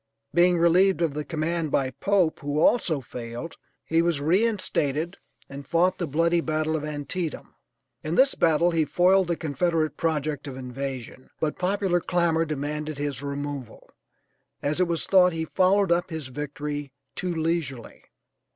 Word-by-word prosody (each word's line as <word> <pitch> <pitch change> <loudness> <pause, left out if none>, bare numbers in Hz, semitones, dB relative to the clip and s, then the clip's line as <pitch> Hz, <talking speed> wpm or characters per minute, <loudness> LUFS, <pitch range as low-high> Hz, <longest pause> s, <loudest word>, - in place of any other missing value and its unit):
Being 175 0 +4
relieved 175 +2 +4
of 160 -4 0
the 150 +1 -3
command 165 +1 -2
by 130 -2 +1
Pope, 185 +3 +1
who 145 +1 -2
also 160 - +3
failed, 120 +6 -7 0.3
he 165 +1 +2
was 170 -3 +1
re 170 +9 +3
instated 170 -7 -1 0.3
and 140 0 -9
fought 175 +2 +2
the 175 - -1
bloody 170 +4 +2
battle 155 0 -1
of 155 - -2
Antietam. 150 +2 -4 0.5
In 155 +2 -2
this 270 +5 +5
battle 165 +2 +3
he 165 -2 +2
foiled 185 +4 +3
the 170 - 0
Confederate 160 +1 -1
project 150 -3 -1
of 130 -2 -7
invasion, 130 0 -6
but 155 -1 -2
popular 185 -1 +1
clamor 170 -2 +1
demanded 150 0 -4
his 145 -2 -3
removal, 140 -3 -6 0.7
as 150 +4 -1
it 180 - +3
was 170 -1 -1
thought 180 -2 +5
he 160 0 -2
followed 190 +2 +2
up 175 +1 +2
his 160 -5 -5
victory 145 0 -5 0.2
too 180 -2 -3
leisurely. 160 -7 -3
160 Hz, 155 wpm, -25 LUFS, 145-175 Hz, 0.7 s, this